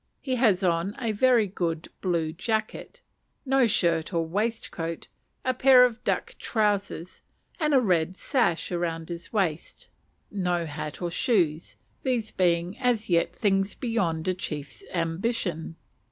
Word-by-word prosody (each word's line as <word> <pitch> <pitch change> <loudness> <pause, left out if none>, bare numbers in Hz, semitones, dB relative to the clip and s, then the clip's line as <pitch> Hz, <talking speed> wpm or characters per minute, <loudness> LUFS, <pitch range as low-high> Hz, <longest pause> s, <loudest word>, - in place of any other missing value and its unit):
He 260 -3 -2
has 210 -6 +3
on 175 +3 +1
a 230 -4 -1
very 235 +1 +4
good 170 -4 -3
blue 170 -4 0
jacket, 220 - -3 0.4
no 270 -2 +4
shirt 170 -5 +1
or 165 -2 0
waistcoat, 185 -3 -3 0.4
a 255 - +2
pair 255 -1 +7
of 240 -2 -3
duck - - -1
trousers, 200 -5 -1 0.4
and 305 -2 +1
a - - +7
red 180 -4 +1
sash 230 - 0
round 165 -2 -2
his 170 0 -7
waist; 180 -7 -2 0.4
no 180 -4 0
hat 150 0 -6
or 175 - -1
shoes, 175 - +1 0.3
these 240 -4 -1
being 175 +2 +1
as 240 -6 0
yet 170 -1 +2
things 195 -1 +1
beyond 185 -9 -1
a 185 - +2
chief's 150 -6 -5
ambition. 170 -1 -2
185 Hz, 140 wpm, -26 LUFS, 170-230 Hz, 0.4 s, pair